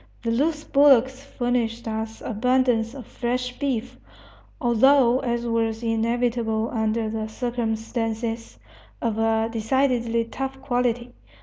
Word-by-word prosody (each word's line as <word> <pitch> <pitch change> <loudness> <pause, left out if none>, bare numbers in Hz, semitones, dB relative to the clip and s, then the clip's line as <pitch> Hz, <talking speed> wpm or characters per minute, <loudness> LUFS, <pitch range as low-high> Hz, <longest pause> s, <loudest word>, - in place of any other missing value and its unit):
The 230 - 0
loose 300 +5 0
bullocks 265 -2 +4
furnished 245 -4 -2
us 220 0 -4
abundance 245 0 +1
of 260 -5 -8
fresh 250 +1 -3
beef, 255 -3 -2 0.6
although, 250 0 +4
as 240 -2 -2
was 225 -1 -1
inevitable 230 0 0
under 220 0 0
the 215 0 -3
circumstances, 225 -1 -3 0.4
of 225 -2 -1
a 225 0 +2
decidedly 235 0 +1
tough 270 +3 -5
quality. 245 -2 -1
235 Hz, 110 wpm, -24 LUFS, 225-250 Hz, 0.6 s, bullocks